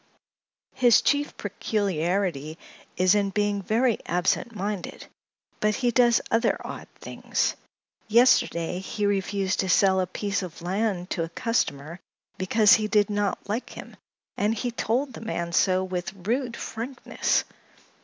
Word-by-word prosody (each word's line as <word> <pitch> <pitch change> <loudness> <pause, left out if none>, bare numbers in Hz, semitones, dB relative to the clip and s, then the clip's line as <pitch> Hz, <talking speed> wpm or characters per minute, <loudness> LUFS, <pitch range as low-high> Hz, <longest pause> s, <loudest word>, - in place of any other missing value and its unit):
His 245 -3 +5
chief 290 0 +1
peculiarity 180 -6 -1 0.4
is 185 +1 +4
in 205 -1 +2
being 205 0 0
very 225 +4 +1
absent 180 +6 0
minded, 205 -2 -4 0.5
but 215 0 +1
he 245 -2 +1
does 240 -1 +4
other 230 +1 +2
odd - - -7
things. - - -2 0.5
Yesterday 210 -7 +3
he 205 +2 -3
refused 195 -1 0
to 190 - 0
sell 190 +1 +4
a 185 - 0
piece 200 +3 -2
of 170 -2 -8
land 190 0 -1
to 175 - -1
a 165 - -5
customer 170 - -2 0.4
because 210 +3 +5
he 215 -1 +3
did 210 -1 +2
not 205 -1 -1
like 220 +5 -3
him, - - -10 0.4
and 210 +2 +1
he 245 +2 -2
told 245 +4 -1
the - - -9
man 170 -6 -3
so 185 0 +3
with 180 -1 -4
rude 235 +6 -2
frankness. 245 +3 -2
205 Hz, 140 wpm, -25 LUFS, 185-225 Hz, 0.5 s, His